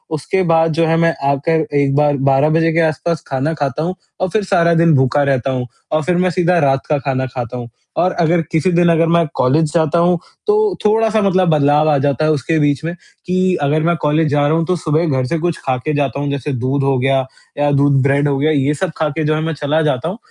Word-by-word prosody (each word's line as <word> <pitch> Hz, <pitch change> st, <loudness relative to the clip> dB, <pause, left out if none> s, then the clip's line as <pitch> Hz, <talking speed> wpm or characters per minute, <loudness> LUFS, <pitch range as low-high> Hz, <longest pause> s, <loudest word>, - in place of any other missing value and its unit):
उसके 190 Hz, +5 st, -1 dB
बाद 165 Hz, 0 st, +3 dB
जो 165 Hz, +1 st, +1 dB
है 165 Hz, -, +2 dB
मैं 165 Hz, 0 st, +2 dB, 0.2 s
आकर 155 Hz, +3 st, 0 dB
1 140 Hz, -1 st, +1 dB
बार 145 Hz, -1 st, +2 dB
12 135 Hz, +3 st, +3 dB
बजे 165 Hz, +1 st, +2 dB
के 170 Hz, -, +1 dB
आस-पास 160 Hz, +1 st, -1 dB
ख़ाना 140 Hz, +4 st, -2 dB
ख़ाता 145 Hz, 0 st, -3 dB
हूँ 180 Hz, +3 st, -3 dB, 0.3 s
और 185 Hz, -, 0 dB
फ़िर 215 Hz, +4 st, -1 dB
सारा 170 Hz, -3 st, +2 dB
दिन 165 Hz, 0 st, +3 dB
भूखा 135 Hz, +2 st, +2 dB
रहता 135 Hz, -2 st, 0 dB
हूँ 125 Hz, -1 st, -3 dB, 0.2 s
और 155 Hz, 0 st, 0 dB
फ़िर 180 Hz, +3 st, 0 dB
मैं 185 Hz, +1 st, +1 dB
सीधा 180 Hz, 0 st, +1 dB
रात 135 Hz, -3 st, +1 dB
का 150 Hz, -, +2 dB
ख़ाना 130 Hz, -1 st, -2 dB
ख़ाता 125 Hz, -1 st, -6 dB
हूँ। 120 Hz, -1 st, -8 dB, 0.3 s
और 185 Hz, +1 st, +2 dB
अगर 170 Hz, +1 st, +2 dB
किसी 160 Hz, +3 st, +1 dB
दिन 175 Hz, 0 st, +3 dB
अगर 165 Hz, 0 st, +2 dB
मैं 170 Hz, 0 st, +3 dB
कॉलेज 150 Hz, +4 st, +1 dB
जाता 165 Hz, 0 st, +1 dB
हूँ, 175 Hz, +1 st, +2 dB, 0.3 s
तो 420 Hz, -1 st, +2 dB
थोड़ा-सा 220 Hz, 0 st, +2 dB
मतलब 185 Hz, -2 st, +2 dB
बदलाव 150 Hz, 0 st, +3 dB
आ 145 Hz, -, +3 dB
जाता 145 Hz, +2 st, 0 dB
है 155 Hz, -, +2 dB
उसके 155 Hz, +2 st, -1 dB
बीच 145 Hz, 0 st, 0 dB
में, 170 Hz, -, -3 dB, 0.3 s
कि 185 Hz, 0 st, +1 dB
अगर 150 Hz, +2 st, 0 dB
मैं 170 Hz, +1 st, +1 dB
कॉलेज 150 Hz, +1 st, +1 dB
जा 145 Hz, 0 st, +1 dB
रहा 160 Hz, -, +1 dB
हूँ 165 Hz, -, -1 dB
तो 180 Hz, +2 st, 0 dB
सुबह 160 Hz, +1 st, -1 dB
घर 130 Hz, -4 st, 0 dB
से 170 Hz, -, -2 dB
कुछ 175 Hz, 0 st, -2 dB
ख़ा 130 Hz, -1 st, 0 dB
के 155 Hz, +5 st, -4 dB
जाता 140 Hz, -1 st, -1 dB
हूँ 145 Hz, -, -2 dB
जैसे 140 Hz, 0 st, -3 dB
दूध 130 Hz, +3 st, -1 dB
हो 135 Hz, -1 st, +1 dB
गया, 135 Hz, 0 st, +1 dB, 0.3 s
या 145 Hz, 0 st, +1 dB
दूध 140 Hz, -1 st, +2 dB
ब्रेड 140 Hz, +1 st, +1 dB
हो 140 Hz, -, 0 dB
गया, 150 Hz, +3 st, +1 dB
ये 145 Hz, -1 st, +1 dB
सब 170 Hz, +3 st, -3 dB
ख़ा 155 Hz, -1 st, 0 dB
के 155 Hz, +2 st, -3 dB
जो 155 Hz, 0 st, 0 dB
है 155 Hz, -, -2 dB
मैं 165 Hz, 0 st, -2 dB
चला 150 Hz, +1 st, -1 dB
जाता 150 Hz, -1 st, -1 dB
हूँ। 190 Hz, -, -6 dB
155 Hz, 250 wpm, -16 LUFS, 140-170 Hz, 0.3 s, बाद